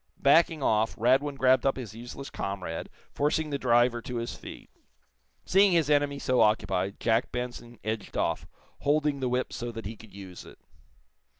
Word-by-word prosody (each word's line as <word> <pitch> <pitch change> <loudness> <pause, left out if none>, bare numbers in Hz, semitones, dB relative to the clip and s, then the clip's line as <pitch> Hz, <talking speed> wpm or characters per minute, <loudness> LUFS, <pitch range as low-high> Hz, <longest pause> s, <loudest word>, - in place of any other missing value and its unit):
Backing 155 +1 +4
off, 110 -1 +2
Radwin 135 +5 +2
grabbed 130 0 +4
up 135 - +1
his 120 -5 -7
useless 120 +4 -8
comrade, 95 -4 -4 0.2
forcing 150 +1 0
the 140 - -2
driver 120 -1 +3
to 125 - -6
his 115 0 -3
feet. - - -11 0.7
Seeing 195 0 +5
his 160 -3 +2
enemy 145 -1 +2
so 130 -3 +1
occupied, 100 -3 +1
Jack 115 0 +1
Benson 120 -1 -6
edged 110 -1 -4
off, - - -1 0.3
holding 145 -1 +1
the 130 -1 -1
whip 125 +1 -1
so 120 0 -4
that 115 -2 -8
he 110 +3 -5
could 110 -1 -15
use 95 -2 -10
it. - - -14
125 Hz, 170 wpm, -28 LUFS, 110-140 Hz, 0.7 s, Seeing